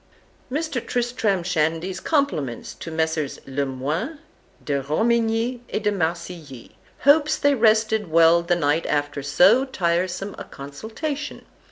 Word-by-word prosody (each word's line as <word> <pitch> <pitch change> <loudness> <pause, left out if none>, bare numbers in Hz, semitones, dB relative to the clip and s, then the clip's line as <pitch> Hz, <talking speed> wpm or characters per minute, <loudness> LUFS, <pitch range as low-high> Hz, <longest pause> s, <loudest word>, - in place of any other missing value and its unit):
Mr. 295 -4 -2
Tristram 230 -6 0
Shandy's 170 +1 -1
compliments 215 - -1
to - - -8
Messrs. 160 -2 -1
Le 135 +1 -2
Moyne, 150 - -3 0.5
De 140 -2 0
Romigny, 225 - +1
and 210 - -2
De 210 - +2
Marcilly; 165 - -4 0.3
hopes 300 +2 +4
they 285 0 +3
all 270 - -2
rested 220 -2 +3
well 165 +1 +5
the 175 +1 +1
night 160 0 +1
after 145 -1 -1
so 185 - +5
tiresome 185 -4 -1
a - - -5
consultation. 220 - -6
180 Hz, 130 wpm, -23 LUFS, 155-235 Hz, 0.5 s, well